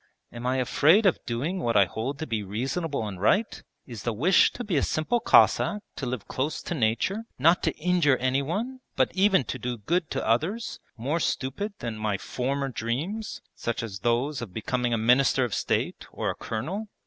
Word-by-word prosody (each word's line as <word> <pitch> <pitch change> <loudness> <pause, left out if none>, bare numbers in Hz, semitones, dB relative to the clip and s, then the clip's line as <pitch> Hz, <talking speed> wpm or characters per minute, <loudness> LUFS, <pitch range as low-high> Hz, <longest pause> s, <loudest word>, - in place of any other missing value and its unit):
'Am 120 +1 -5
I 130 - +1
afraid 155 - +4
of 190 - +2
doing 145 +11 -2
what 115 -9 +1
I 100 - +7
hold 115 - -4
to 155 - -4
be 110 -6 -2
reasonable 130 - -2
and 95 -3 -7
right? 200 - +2 0.2
Is 115 -5 -8
the 120 - -1
wish 160 - +4
to 245 - -5
be 200 -6 -2
a 140 - +3
simple 195 +11 0
Cossack, 210 -2 +4
to 135 - -3
live 125 -4 -4
close 145 +4 -2
to - - -3
nature, 150 - 0
not 165 +7 +4
to - - +1
injure 160 -5 +2
anyone 160 - -1 0.2
but 130 - +2
even 190 -3 +4
to - - -5
do 125 -1 -3
good 165 - -1
to - - -2
others, 165 - 0 0.2
more 140 +9 -1
stupid 160 +9 -2
than 115 -3 -4
my 105 -2 0
former 135 +6 -2
dreams, 145 - -3
such 115 0 -3
as 100 -4 -6
those 125 +5 0
of 100 -6 -8
becoming 120 +2 -1
a 115 - +2
minister 125 +4 +4
of 120 -4 -2
state - - -1
or - - -2
a - - -7
colonel?' 170 - -4
135 Hz, 195 wpm, -26 LUFS, 115-175 Hz, 0.2 s, I